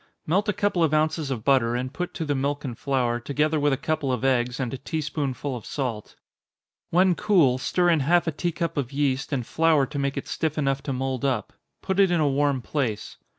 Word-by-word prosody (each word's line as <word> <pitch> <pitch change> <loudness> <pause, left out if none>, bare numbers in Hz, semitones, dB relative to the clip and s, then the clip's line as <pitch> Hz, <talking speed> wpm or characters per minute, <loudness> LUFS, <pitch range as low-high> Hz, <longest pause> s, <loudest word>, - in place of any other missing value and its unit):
Melt 200 +7 +1
a - - +2
couple 195 -4 +1
of 155 -1 +2
ounces 155 -1 0
of 120 -5 -3
butter, 125 -3 +3
and 130 +2 -3
put 180 +2 -3
to 165 - -3
the 145 - 0
milk 140 +2 -2
and 125 -3 -4
flour, 125 -2 0
together 150 +5 0
with 145 0 +2
a 135 - +1
couple 155 -2 -1
of 125 +1 -1
eggs, 125 -1 +1
and 125 -2 -2
a - - -3
tea 160 +4 -3
spoonful 140 -2 -3
of 120 - -7
salt. 120 -6 -4 0.7
When 180 +2 +4
cool, 165 -10 +3
stir 175 +6 +2
in 165 - +3
half 170 +5 +3
a 165 - 0
tea 175 +4 -2
cup 170 -1 -3
of 135 -3 -2
yeast, 135 -2 -1
and 130 -4 -1
flour 160 -2 +3
to 140 +1 -5
make 140 0 -1
it - - -4
stiff 160 -1 -2
enough 135 -2 0
to - - 0
mould 130 0 -2
up. 130 -7 -1 0.3
Put 190 +1 -1
it 195 -2 +6
in 175 -1 +2
a 150 - +3
warm 140 -2 +1
place. 120 -8 -3
140 Hz, 235 wpm, -25 LUFS, 130-160 Hz, 0.7 s, it